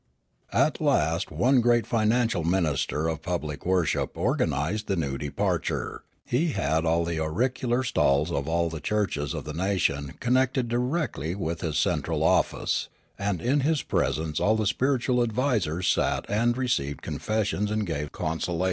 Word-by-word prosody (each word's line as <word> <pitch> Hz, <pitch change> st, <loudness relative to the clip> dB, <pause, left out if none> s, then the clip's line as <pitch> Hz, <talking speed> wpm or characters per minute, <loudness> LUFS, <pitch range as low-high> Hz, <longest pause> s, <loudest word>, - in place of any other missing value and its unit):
At -, -, +2 dB
last 80 Hz, +4 st, +1 dB
one 130 Hz, +1 st, +3 dB
great 120 Hz, 0 st, +3 dB
financial 115 Hz, -4 st, +1 dB
minister 80 Hz, -3 st, 0 dB
of 80 Hz, -1 st, -2 dB
pui>lic 80 Hz, -3 st, -4 dB
worship 90 Hz, -3 st, +1 dB
organised 90 Hz, +11 st, 0 dB
the 100 Hz, -, +1 dB
new 70 Hz, -6 st, -2 dB
departure; 70 Hz, 0 st, -2 dB, 0.2 s
he 150 Hz, +5 st, 0 dB
had 80 Hz, +3 st, 0 dB
all 85 Hz, +1 st, +2 dB
the 85 Hz, -1 st, -2 dB
auricular 120 Hz, +9 st, 0 dB
stalls 75 Hz, -, +2 dB
of 70 Hz, -2 st, -2 dB
all 85 Hz, +1 st, +1 dB
the 80 Hz, -, -5 dB
churches 90 Hz, -10 st, -1 dB
of -, -, -4 dB
the 75 Hz, -, -6 dB
nation 80 Hz, -6 st, 0 dB
connected 130 Hz, +1 st, +1 dB
directly 120 Hz, -, -1 dB
with 85 Hz, -3 st, -3 dB
his 80 Hz, -4 st, -1 dB
cen -, -, +2 dB
tral -, -, -2 dB
office; -, -, +1 dB, 0.3 s
and 100 Hz, -4 st, -1 dB
in 135 Hz, +4 st, +2 dB
his 145 Hz, 0 st, +1 dB
presence 75 Hz, 0 st, -1 dB
all 110 Hz, -, +3 dB
the 110 Hz, -1 st, 0 dB
spiritual 125 Hz, +2 st, +1 dB
advisers 110 Hz, -, 0 dB
sat -, -, +1 dB
and 115 Hz, +4 st, +1 dB
received 90 Hz, -, -1 dB
confessions 105 Hz, -1 st, -1 dB
and 110 Hz, 0 st, -1 dB
gave 75 Hz, -4 st, -3 dB
consolations. 80 Hz, +2 st, -2 dB
95 Hz, 155 wpm, -26 LUFS, 80-120 Hz, 0.3 s, one